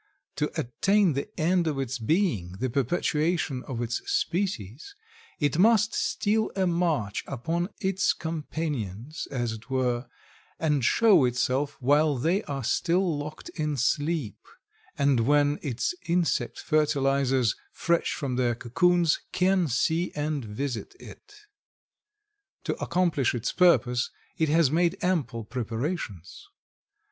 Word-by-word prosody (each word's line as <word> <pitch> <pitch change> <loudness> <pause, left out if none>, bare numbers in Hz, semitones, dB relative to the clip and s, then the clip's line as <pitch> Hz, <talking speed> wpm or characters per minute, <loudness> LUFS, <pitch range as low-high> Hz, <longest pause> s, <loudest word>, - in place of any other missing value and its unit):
To - - 0
attain 190 - +2
the 140 +8 -3
end 170 +1 +2
of 150 -3 -1
its 135 -1 -3
being, 115 - 0
the 120 +6 -3
perpetuation 150 +1 0
of 120 -4 -3
its 120 0 -2
species, 165 - -2 0.4
it 145 +1 +1
must 220 +2 +4
steal 215 +1 0
a 190 -1 +1
march 165 - 0
upon 165 - -2
its 190 0 +1
companions, 150 - -4
as 120 -4 -2
it 110 +3 -9
were, 125 -2 0 0.5
and 150 -4 +1
show 210 - +5
itself 130 +3 0
while 145 +2 +3
they 170 - +1
are 140 -2 -4
still 175 +7 +1
locked 150 +2 -7
in 150 -3 -2
sleep, 145 -1 0 0.6
and 140 -3 +3
when 145 0 +3
its 135 - -2
insect 175 0 0
fertilizers, 135 -5 +2 0.2
fresh 170 0 0
from 135 -5 -3
their 120 -2 +1
cocoons, 170 +8 +2
can 185 -1 +2
see 160 +7 0
and 150 -2 -2
visit 120 - -5
it. 420 0 -14 1.2
To - - -1
accomplish 170 -8 +1
its 120 0 -2
purpose 125 -9 +3 0.3
it 160 -2 +1
has 155 -3 +4
made 170 +1 +2
ample 150 -11 0
preparations. 115 - -5
145 Hz, 125 wpm, -27 LUFS, 125-170 Hz, 1.2 s, show